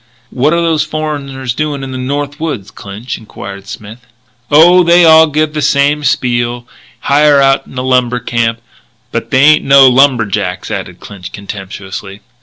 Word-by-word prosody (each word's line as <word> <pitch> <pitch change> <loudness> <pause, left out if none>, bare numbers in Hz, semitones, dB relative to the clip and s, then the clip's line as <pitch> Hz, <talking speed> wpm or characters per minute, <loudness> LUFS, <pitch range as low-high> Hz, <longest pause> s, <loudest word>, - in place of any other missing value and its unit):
"What 135 +4 0
are 170 0 +1
those 165 -2 +1
foreigners 145 -5 -5
doing 145 0 -3
in 135 - -6
the 130 - -5
North 145 +3 -4
Woods, 125 - -5
Clinch?" 105 +5 -8
enquired 100 -2 -10
Smith. 110 +3 -11 0.4
"Oh, 175 +5 +5
they 170 0 +4
all 160 0 +6
give 155 0 -1
the 150 - -3
same 145 +1 +1
spiel 120 -3 -1 0.3
hire 145 0 +3
out 135 0 +2
in 130 - -12
a 125 - -2
lumber 125 -1 0
camp. 115 -1 -2 0.5
But - - -4
they 130 +1 +2
ain't 155 +1 +5
no 135 -1 +6
lumberjacks," 115 -8 +1
added - - -6
Clinch 90 -3 -10
contemptuously. 100 0 -9
135 Hz, 160 wpm, -12 LUFS, 115-150 Hz, 0.5 s, all